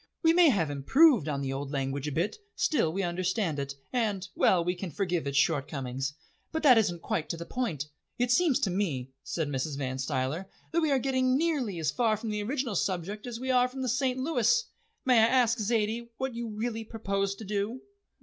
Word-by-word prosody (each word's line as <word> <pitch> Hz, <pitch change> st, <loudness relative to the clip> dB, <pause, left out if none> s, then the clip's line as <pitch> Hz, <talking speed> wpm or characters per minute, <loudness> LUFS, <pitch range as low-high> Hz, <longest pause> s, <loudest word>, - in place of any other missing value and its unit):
"We 325 Hz, 0 st, +6 dB
may 345 Hz, -2 st, +6 dB
have 170 Hz, -, +1 dB
improved 225 Hz, -, +4 dB
on 140 Hz, -2 st, -2 dB
the 135 Hz, -1 st, -2 dB
old 135 Hz, +1 st, -4 dB
language 135 Hz, 0 st, -2 dB
a -, -, -2 dB
bit, 170 Hz, +9 st, -1 dB, 0.2 s
still 230 Hz, -, +1 dB
we 195 Hz, +3 st, -2 dB
understand 180 Hz, -2 st, -1 dB
it, 140 Hz, 0 st, -4 dB, 0.2 s
and 210 Hz, -6 st, 0 dB
well, 175 Hz, -2 st, +3 dB
we 180 Hz, -, +1 dB
can 180 Hz, 0 st, -6 dB
forgive 175 Hz, -4 st, -1 dB
its 140 Hz, 0 st, -1 dB
shortcomings. 135 Hz, -2 st, 0 dB, 0.4 s
But 320 Hz, 0 st, -3 dB
that 255 Hz, -6 st, +7 dB
isn't 175 Hz, -6 st, -1 dB
quite 155 Hz, -2 st, -2 dB
to 170 Hz, -, -2 dB
the 170 Hz, -, -6 dB
point." 170 Hz, -, -2 dB, 0.3 s
"It 245 Hz, -1 st, +1 dB
seems 295 Hz, +1 st, +4 dB
to 190 Hz, -, +1 dB
me," 150 Hz, -10 st, -2 dB
said 160 Hz, +1 st, -2 dB
Mrs. 140 Hz, +1 st, -2 dB
Van 130 Hz, -2 st, -3 dB
Stuyler, 135 Hz, +8 st, -2 dB, 0.2 s
"that 335 Hz, -, +2 dB
we 315 Hz, -, +2 dB
are 275 Hz, -, +3 dB
getting 260 Hz, 0 st, +2 dB
nearly 285 Hz, -, 0 dB
as 155 Hz, -3 st, 0 dB
far 225 Hz, -3 st, +1 dB
from 220 Hz, +1 st, -4 dB
the 210 Hz, 0 st, -2 dB
original 250 Hz, +1 st, -2 dB
subject 190 Hz, +4 st, -2 dB
as 235 Hz, -1 st, -5 dB
we 260 Hz, +1 st, -1 dB
are 250 Hz, 0 st, +4 dB
from 260 Hz, +1 st, -6 dB
the -, -, -1 dB
St. 255 Hz, +1 st, +1 dB
Louis. 330 Hz, -, +2 dB, 0.4 s
May 250 Hz, -3 st, +5 dB
I 220 Hz, -, +6 dB
ask, 240 Hz, -2 st, +3 dB
Zaidie, 225 Hz, +2 st, 0 dB
what 265 Hz, -1 st, -2 dB
you 235 Hz, 0 st, -4 dB
really 225 Hz, +1 st, -3 dB
propose 200 Hz, -3 st, -2 dB
to 220 Hz, -, -9 dB
do?" 210 Hz, +5 st, -2 dB
205 Hz, 210 wpm, -29 LUFS, 155-250 Hz, 0.4 s, that